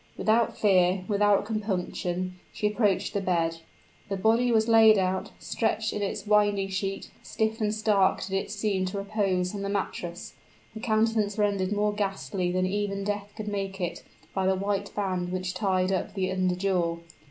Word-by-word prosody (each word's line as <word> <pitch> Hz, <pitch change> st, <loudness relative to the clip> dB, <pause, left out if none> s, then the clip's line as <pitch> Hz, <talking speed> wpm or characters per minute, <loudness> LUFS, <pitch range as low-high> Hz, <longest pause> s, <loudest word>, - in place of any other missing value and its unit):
Without 225 Hz, +1 st, +2 dB
fear 185 Hz, -2 st, +3 dB
without 205 Hz, -1 st, +3 dB
compunction, 185 Hz, -4 st, -3 dB
she 210 Hz, -, -4 dB
approached 210 Hz, -2 st, +1 dB
the 200 Hz, -, 0 dB
bed. 165 Hz, -3 st, 0 dB, 0.5 s
The 195 Hz, -, -1 dB
body 230 Hz, +5 st, +3 dB
was 220 Hz, -1 st, +3 dB
laid 225 Hz, -2 st, +7 dB
out: 190 Hz, +1 st, 0 dB
stretched 220 Hz, -1 st, -1 dB
in 210 Hz, -, -3 dB
its 200 Hz, -, -3 dB
winding 205 Hz, -2 st, +3 dB
sheet, 195 Hz, 0 st, -3 dB
stiff 220 Hz, +1 st, -2 dB
and 210 Hz, -1 st, +1 dB
stark 210 Hz, -3 st, +2 dB
did 190 Hz, -, -7 dB
it 195 Hz, -, -1 dB
seem 205 Hz, -2 st, -1 dB
to 185 Hz, +2 st, -4 dB
repose 195 Hz, -3 st, 0 dB
on 200 Hz, -, -4 dB
the 200 Hz, -, -2 dB
mattress 180 Hz, -3 st, -4 dB, 0.4 s
the 220 Hz, -, -7 dB
countenance 220 Hz, -2 st, +1 dB
rendered 200 Hz, -2 st, +1 dB
more 210 Hz, 0 st, +1 dB
ghastly 195 Hz, -3 st, -2 dB
than 185 Hz, +1 st, +1 dB
even 200 Hz, +1 st, -1 dB
death 205 Hz, 0 st, -3 dB
could 215 Hz, -1 st, -5 dB
make 195 Hz, -1 st, -3 dB
it, 175 Hz, -2 st, -3 dB, 0.3 s
by 190 Hz, -1 st, 0 dB
the 190 Hz, -, +3 dB
white 200 Hz, +1 st, -2 dB
band 185 Hz, -3 st, -1 dB
which 185 Hz, 0 st, -2 dB
tied 185 Hz, -1 st, +1 dB
up 190 Hz, +2 st, -2 dB
the 185 Hz, -1 st, -1 dB
under 185 Hz, -1 st, +1 dB
jaw. 180 Hz, -3 st, 0 dB
200 Hz, 175 wpm, -27 LUFS, 185-210 Hz, 0.5 s, laid